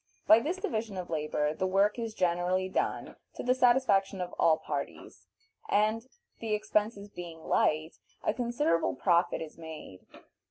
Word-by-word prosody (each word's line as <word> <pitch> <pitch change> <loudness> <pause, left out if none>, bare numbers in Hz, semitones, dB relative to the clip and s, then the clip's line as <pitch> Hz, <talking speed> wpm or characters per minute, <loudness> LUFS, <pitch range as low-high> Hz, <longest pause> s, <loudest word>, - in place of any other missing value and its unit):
By 220 - +8
this 320 +10 -2
division 220 - -3
of 180 -2 -6
labor 150 -1 0
the 185 +4 -1
work 200 +4 +2
is 225 -2 -4
generally 180 +1 +1
done 190 - -2 0.2
to - - -5
the 250 - +3
satisfaction 240 -7 +3
of 180 -1 -4
all 160 -1 +5
parties, 145 -3 -6 0.4
and, 215 +3 +1 0.3
the 220 -2 -1
expenses 210 0 -1
being 170 -3 -9
light, 155 +1 +1 0.2
a - - +1
considerable 240 - 0
profit 170 -2 +2
is 160 +1 -12
made. 160 - -10
195 Hz, 150 wpm, -30 LUFS, 165-225 Hz, 0.4 s, By